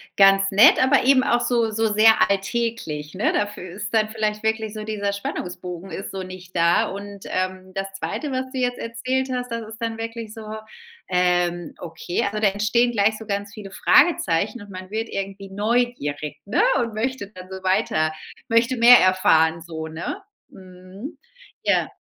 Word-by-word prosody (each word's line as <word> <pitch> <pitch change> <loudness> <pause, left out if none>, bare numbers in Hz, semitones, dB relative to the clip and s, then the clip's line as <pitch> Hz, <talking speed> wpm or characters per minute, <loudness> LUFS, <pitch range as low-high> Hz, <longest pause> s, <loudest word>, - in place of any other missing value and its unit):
ganz 195 0 +5
nett, 205 +5 +6
aber 265 +1 +4
eben 260 0 +5
auch 240 0 +2
so 235 -2 +1
so 225 0 0
sehr 220 +1 +6 0.2
alltäglich, 195 -7 -2
ne? 200 - +1
Dafür 205 -3 -2
ist 205 +4 -6
dann 215 -1 +3
vielleicht 215 -1 -2
wirklich 220 -1 -1
so 215 -1 -6
dieser 205 -2 -2
Spannungsbogen 180 -2 -6
ist 195 - -6
so 190 -1 -5
nicht 185 0 -11
da. 170 0 +3
Und, 200 0 -8
ähm, 185 0 -3
das 195 0 -4
2. 290 +8 -4
was 260 0 -2
du 260 - -3
jetzt 245 -1 0
erzählt 255 +3 -2
hast, 250 -1 -4
das 230 -2 -4
ist 225 +2 -11
dann 225 -1 -2
wirklich 225 -1 -6
so, 220 -1 -9 0.6
ähm, 175 -2 +1
okay, 170 +1 -3
also 210 +1 -2
da 210 - +4
entstehen 215 +5 +1
gleich 215 0 +2
so 220 - -10
ganz 200 -1 -3
viele 200 -2 -9
Fragezeichen, 210 - +3
und 205 - -12
man 185 0 -9
wird 225 +2 -3
irgendwie 195 0 -5
neugierig, 205 -9 -1
ne? 225 - +1 0.2
Und 230 -2 -2
möchte 225 -1 -3
dann 185 -2 -12
so 190 0 -7
weiter 155 -4 +1 0.3
möchte 235 +3 +2
mehr 240 +1 +9
erfahren 165 -3 +3
so, 160 -1 -6
ne? 165 - -5 0.3
Mhm. 185 - -11 0.5
Ja. - - +1
205 Hz, 175 wpm, -23 LUFS, 185-230 Hz, 0.6 s, mehr